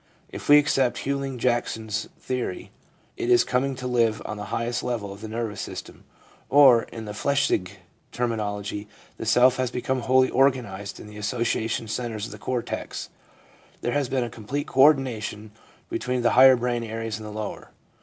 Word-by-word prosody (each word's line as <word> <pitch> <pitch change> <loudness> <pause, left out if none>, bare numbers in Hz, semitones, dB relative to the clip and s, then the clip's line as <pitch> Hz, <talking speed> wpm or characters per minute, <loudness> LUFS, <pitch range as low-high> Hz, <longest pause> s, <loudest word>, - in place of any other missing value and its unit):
If - - -8
we 145 - +10
accept 135 -4 +1
Hughlings 140 -1 -2
Jackson's 110 -3 -1
theory, 130 - -4 0.5
it 360 0 -2
is 365 -1 +6
coming 130 +2 0
to 125 - -7
live 115 -3 +2
on 105 - -5
the 105 - -6
highest 115 +4 -2
level 110 -5 -3
of 100 - -13
the 110 - -6
nervous 110 -2 -4
system; - - -8 0.4
or, 135 -4 +7
in 115 -1 -8
the 105 - -6
Flechsig 105 -5 0 0.4
terminology, 105 -3 -3 0.3
the 115 - -5
self 125 +3 +5
has 130 -1 0
become 130 +1 -2
wholly 130 +1 +3
organised 120 -7 0
in - - -10
the 105 0 -11
association 115 +1 -1
centres 110 -2 -3
of - - -8
the 105 - -10
cortex. 125 +2 -4 0.7
There 120 - -1
has 145 -3 0
been 130 -2 0
a 120 - -4
complete 125 +7 -4
co 130 - +1
ordination 120 -7 +2 0.4
between 125 -1 -2
the 120 - +4
higher 130 0 +8
brain 120 -1 -1
areas 115 -1 -4
and 110 - -9
the - - -7
lower. 105 -1 -6
120 Hz, 175 wpm, -25 LUFS, 110-130 Hz, 0.7 s, we